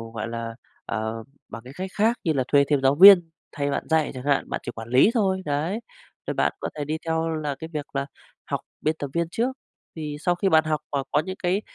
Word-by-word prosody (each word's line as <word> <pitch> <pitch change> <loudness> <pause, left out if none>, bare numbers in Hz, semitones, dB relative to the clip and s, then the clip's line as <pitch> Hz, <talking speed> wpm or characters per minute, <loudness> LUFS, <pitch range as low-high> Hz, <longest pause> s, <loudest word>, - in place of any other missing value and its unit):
gọi 110 - -3
là, 115 0 -5 0.3
ờ, 110 0 -3 0.3
bằng 115 - -8
những 130 - -10
cách 185 +1 -4
khác 225 +3 +2
như 160 - +1
là 135 -3 +1
thuê 140 0 +5
thêm 145 -2 +2
giáo 135 +1 +3
viên 180 0 +9 0.2
thay 145 -1 -2
bạn - - -1
dạy 160 -2 +2
chẳng 130 -1 -7
hạn, 140 -1 +1
bạn - - -3
chỉ - - -5
quản 115 0 -9
lý 130 - +6
thôi, 190 -5 +1
đấy. 155 +8 -1 0.5
Thì - - -1
bạn - - +1
có - - -3
thể 145 - -3
đi 155 +2 -2
theo 160 0 0
là 150 -3 -3
cái 160 - -6
việc 150 -2 -3
là 140 0 0 0.4
học - - -2 0.2
biên 155 +1 +1
tập 145 - -4
viên 170 -1 0
trước, 250 +8 -1 0.4
thì 150 -2 -5
sau 175 +3 +1
khi 195 +2 +1
bạn 160 -3 +5
học 155 -1 0
và 140 -2 -1
có 145 - +3
những 185 +4 -4
cái, 180 +3 +1
150 Hz, 245 wpm, -24 LUFS, 135-175 Hz, 0.5 s, viên